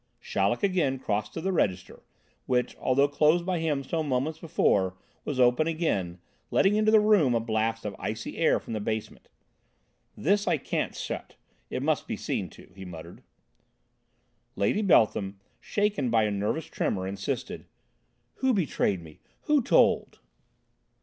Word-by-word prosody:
Chaleck 100 +4 0
had 200 - +2
again 145 -8 +1
crossed 105 -4 -2
to 165 - -3
the 190 - -1
register, 95 - -1 0.5
which, 125 -1 0
although 135 +2 +2
closed 155 +4 +2
by 180 -2 0
him 150 -4 -1
some 155 +2 -2
moments 140 +5 -1
before, 95 - +1 0.3
was 145 -3 -3
open 125 +5 +4
again, 130 - -1 0.3
letting 195 +1 +3
into 215 0 +3
the 220 0 +7
room 205 - +4
a - - +3
blast 115 0 -1
of 100 -2 -4
icy - - -4
air - - +3
from - - -8
the 110 - -2
basement. 110 +1 -5 0.9
"This 200 +5 +2 0.2
can't - - -2
stay - - -3
shut, - - -12 0.3
it - - -3
must - - 0
be - - -3
seen - - -3
to," - - -16
he 95 - -9
muttered. 85 -1 -10 1.3
Lady 100 - +1
Beltham, 105 - +3 0.2
shaken 205 - 0
by 115 -1 +3
a 105 - 0
nervous 105 +10 -1
tremour, 95 -1 -2
insisted: 100 +1 -4 0.7
"Who 260 -2 +2
betrayed 115 - 0
me? 80 -2 -14 0.2
Who 300 -2 +2
told?" - - +3
130 Hz, 155 wpm, -27 LUFS, 100-170 Hz, 1.3 s, the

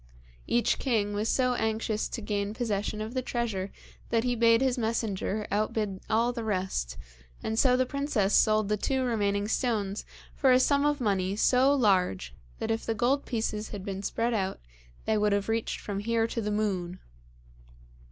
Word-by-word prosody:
Each 235 -1 +2
king 215 -6 0
was 210 +2 -1
so 250 -1 +2
anxious 220 -2 -1
to 230 - -5
gain 205 0 -2
possession 215 -2 -2
of 220 +2 -5
the 260 - 0
treasure 220 -6 -2 0.4
that 230 -1 +2
he 245 -1 0
bade 230 0 +5
his 260 -1 +2
messenger 220 -3 -1
outbid 205 -1 -1
all 230 +2 +2
the 235 -2 -4
rest, 185 - -2 0.5
and 220 +1 -1
so 250 -2 +4
the 255 - +2
princess 255 -7 0
sold 215 -1 +4
the 210 +1 +1
two 265 +5 0
remaining 205 -4 0
stones 215 -4 -1 0.3
for 265 -3 +3
a 255 - +6
sum 280 +2 +3
of 295 -2 0
money 195 -3 0
so 255 +5 +4
large 180 - +1 0.2
that - - -2
if 225 - -1
the 225 - -1
gold 260 +6 +1
pieces 220 -2 -2
had 200 -2 -7
been 195 -1 -4
spread 230 +4 -1
out 190 -3 -1 0.5
they 220 -1 +2
would 210 -1 +2
have 200 0 0
reached 225 0 -1
from 200 -1 -4
here 225 +2 +1
to 230 0 -3
the 210 - -2
moon. 190 -4 -1
220 Hz, 180 wpm, -28 LUFS, 205-240 Hz, 0.5 s, a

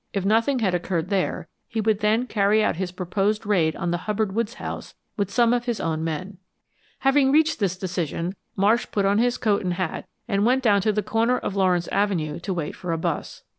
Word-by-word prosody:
If 195 -2 -1
nothing 230 +6 +3
had 205 -7 +1
occurred 175 -1 -1
there, 185 -3 -1 0.2
he 225 - -3
would 215 -1 +1
then 220 +3 +2
carry 210 -2 +2
out 185 - 0
his 185 -1 -3
proposed 195 +4 -1
raid 175 -6 +2
on 170 - -2
the 175 - +1
Hubbard 210 -1 0
Woods 230 +2 -1
house - - -7 0.2
with 200 -2 -1
some 235 +3 +3
of 240 0 0
his 240 -3 -2
own 160 -1 -1
men. 180 +4 -4 0.6
Having 270 0 +4
reached 315 -1 +3
this 190 -3 0
decision 175 -1 -3 0.2
Marsh 210 +5 +2
put 200 -2 +1
on 200 +2 +3
his 245 +1 +2
coat 210 -3 +1
and 180 -1 -1
hat 180 -3 -3 0.2
and 200 -3 +1
went 255 +3 +3
down 205 -4 +4
to 215 - +2
the 210 0 -1
corner 230 +4 +1
of 200 - -4
Lawrence 180 -3 +2
Avenue 175 -6 0
to 190 +3 -4
wait 170 -5 -3
for 180 - -5
a 165 - 0
bus. 160 - -3
200 Hz, 215 wpm, -24 LUFS, 180-225 Hz, 0.6 s, Having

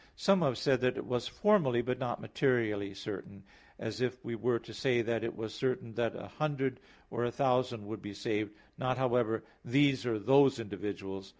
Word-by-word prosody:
Some 195 -2 +4
have 135 -7 +2
said 130 -3 +2
that 125 0 +2
it - - -4
was 125 -1 -1
formally, 135 - +3
but 125 +1 -1
not 125 -3 -2
materially 110 -4 0
certain; 100 0 -7 0.3
as 110 0 -4
if 125 0 -2
we 120 - -3
were 115 +1 +1
to 115 - -10
say 120 +1 +2
that 115 0 -1
it 115 - -3
was 110 -1 -5
certain 125 0 -2
that 115 0 0
a - - -7
hundred 135 -4 -2 0.3
or 120 - -1
a 120 - +1
thousand 125 -4 +1
would 110 0 -6
be 100 -1 -7
saved; 105 0 -1 0.3
not 130 -2 0
however 120 -4 +1 0.2
these 135 +1 +3
or 115 -2 +1
those 135 +4 +5
individuals. 100 -2 -5
120 Hz, 190 wpm, -32 LUFS, 110-130 Hz, 0.3 s, those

